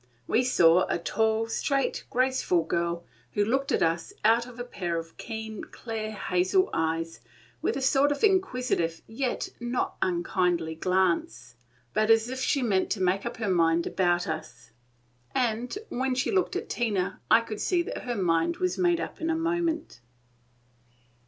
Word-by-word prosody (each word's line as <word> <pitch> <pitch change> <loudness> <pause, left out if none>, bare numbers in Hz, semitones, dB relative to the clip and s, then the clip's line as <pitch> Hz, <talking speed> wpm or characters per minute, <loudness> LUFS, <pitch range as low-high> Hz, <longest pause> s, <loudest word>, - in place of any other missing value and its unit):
We 240 - +2
saw 180 -8 +5
a - - +1
tall, 220 +5 +1
straight, 275 +4 -1
graceful 255 -9 +2
girl, 170 +1 -1 0.3
who 205 - +2
looked 270 +5 0
at - - +2
us 165 0 0
out 230 +2 +4
of 250 -1 -12
a - - -2
pair 175 -8 -3
of 165 0 -7
keen, 220 -2 -6
clear, 225 -2 -5
hazel 190 - +1
eyes, 165 0 -1 0.4
with - - 0
a 270 - -3
sort 275 +2 +4
of 290 - -3
inquisitive 250 - +1
yet 245 +3 -2
not 240 +1 -2
unkindly 175 -2 0
glance, 165 -9 0 0.4
but 215 +1 +2
as 225 +1 +4
if 260 0 -4
she 265 +1 +1
meant 195 -5 +1
to 210 - -6
make 190 +4 +1
up - - -6
her 225 -2 -2
mind 170 -2 +3
about 175 -2 +1
us; 125 -7 -6 0.6
and 245 - 0
when 260 +1 -1
she 255 - 0
looked 380 -3 +1
at - - -3
Tina 200 -5 -1
I 225 +1 +7
could 215 -2 -6
see 350 -2 +2
that - - -5
her 245 -1 -4
mind 175 - +1
was 365 0 -1
made 350 -2 +3
up - - -6
in 325 - -1
a 325 - +2
moment. 330 - -1
220 Hz, 165 wpm, -27 LUFS, 175-255 Hz, 0.6 s, I